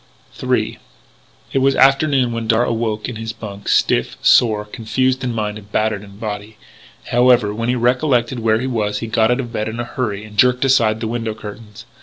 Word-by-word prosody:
III - - -1 0.7
It 135 - +2
was 135 +1 +3
afternoon 135 -2 +3
when 115 -1 -4
Darragh 115 +1 +2
awoke 110 -2 -2
in 120 - -6
his 110 0 -5
bunk, 105 -3 -9
stiff, - - +1
sore, 110 -3 +4
confused 130 +4 -1
in 125 - -1
mind 105 -2 -3
and 100 0 -18
battered 110 -1 0
in 100 -1 -14
body. 105 0 -6 0.5
However, 120 -3 +4
when 115 +2 -3
he 125 - +2
recollected 125 0 +1
where 110 -1 +2
he 130 - -3
was 105 -5 -1
he 115 - -4
got 110 0 +2
out 125 +2 +1
of 120 -3 -5
bed 110 0 -2
in 115 +2 -6
a - - -1
hurry 110 -4 -4
and 105 -1 -9
jerked 125 +1 +4
aside 115 -5 +3
the 115 - -2
window 115 -1 -3
curtains. 105 +1 -10
115 Hz, 200 wpm, -19 LUFS, 105-125 Hz, 0.7 s, sore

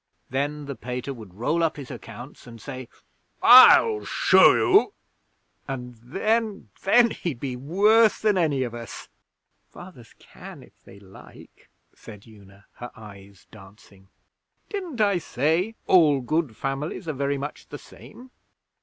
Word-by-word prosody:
Then 145 +2 -3
the 140 - -6
Pater 125 +1 -6
would 110 -7 -14
roll 150 +10 -1
up 160 -1 -1
his 140 -3 -9
accounts, 125 +4 -12
and 115 -1 -12
say, 130 -1 -9 0.5
"I'll 430 -2 +7
show - - +4
you!" 405 +1 +2 0.7
and 125 -3 -7
then 215 - -3
then, 235 +3 +4
he'd 155 -9 -5
be 130 -2 -5
worse 205 - +2
than 215 -2 +1
any 150 -7 0
of 120 -2 -6
us!' 115 -2 -10 0.6
'Fathers 175 - -15
can - - -14
if - - -20
they 100 - -15
like,' 95 -1 -17 0.2
said 105 -2 -14
Una, 100 -2 -19
her 120 - -8
eyes 100 -4 -15
dancing. 95 -1 -18 0.6
'Didn't 355 - -5
I 200 -4 +2
say 165 - -1
all 150 -7 +4
good 140 -2 -2
families 135 +6 -5
are 155 - -3
very 140 +1 -2
much 145 +2 -8
the - - -9
same?' 250 +1 -16
140 Hz, 140 wpm, -23 LUFS, 115-185 Hz, 0.7 s, I'll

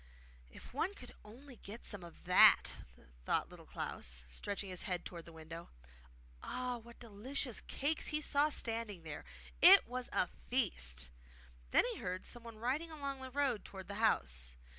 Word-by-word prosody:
'If 65 - -13
one 350 +9 -1
could 250 - -11
only 250 +4 -13
get 210 +4 -8
some 205 -4 0
of 170 -1 -12
that!' 180 +1 +7 0.5
thought - - +1
Little - - -13
Klaus, - - -4
stretching 200 - -4
his 180 - 0
head 180 -1 -2
towards 170 -2 -7
the 170 - -11
window. 165 +1 -9 0.7
Ah, 250 -1 -3
what 235 +1 -14
delicious 235 +3 -2
cakes 295 +3 0
he 305 - +2
saw 295 0 +3
standing 225 - -3
there! 155 -2 -7 0.4
It 385 +3 +10
WAS 250 +1 -4
a - - +3 0.2
feast! 65 - +1 0.6
Then - - +5
he - - -8
heard 185 +1 -4
someone 230 -2 -7
riding 265 +9 -1
along 280 -4 -5
the 260 - -6
road 265 -4 0
towards 190 0 -9
the - - -3
house. - - +1
225 Hz, 160 wpm, -36 LUFS, 175-260 Hz, 0.7 s, It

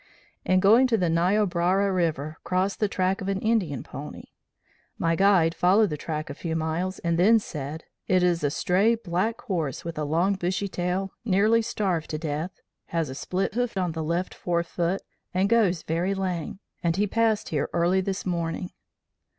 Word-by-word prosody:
In 185 0 +3
going 225 +7 +6
to 230 -3 +2
the 175 -4 +1
Niobrara 185 +2 +2
River 160 -4 -1
crossed 185 +3 0
the 210 - +2
track 190 0 0
of 195 - -3
an 195 -1 0
Indian 200 - 0
pony. - - -8 0.7
My 165 0 +1
guide 190 -3 +4
followed 185 +4 +3
the - - -1
track 155 +1 -4
a 145 - -5
few 160 +2 -4
miles 165 +4 -2
and 170 0 -1
then 220 +6 +6
said, 155 -6 -5 0.2
'It 185 -1 +3
is 175 -3 +2
a 145 - +3
stray, 195 +9 +2
black 215 +2 -2
horse, 165 - -3
with 165 -2 -5
a - - -1
long, 170 +7 +2
bushy 190 +1 -1
tail, 185 +1 -2
nearly 215 +2 +3
starved 190 -7 -2
to 155 - -2
death, 155 +3 -4 0.3
has 165 -4 -1
a - - -5
split 185 +8 -2
hoof 245 -2 -1
of 180 -3 0
the 160 -1 -3
left 170 +4 -1
fore 170 -1 -1
foot, 175 +2 -2 0.3
and 190 +2 +2
goes 205 -7 +3
very 175 +5 -1
lame, 185 -4 -3 0.2
and 170 -2 +1
he 205 +2 +2
passed 220 0 +1
here 150 -3 -1
early 175 +2 +2
this 190 +1 -3
morning.' 170 0 -2
180 Hz, 185 wpm, -26 LUFS, 165-195 Hz, 0.7 s, going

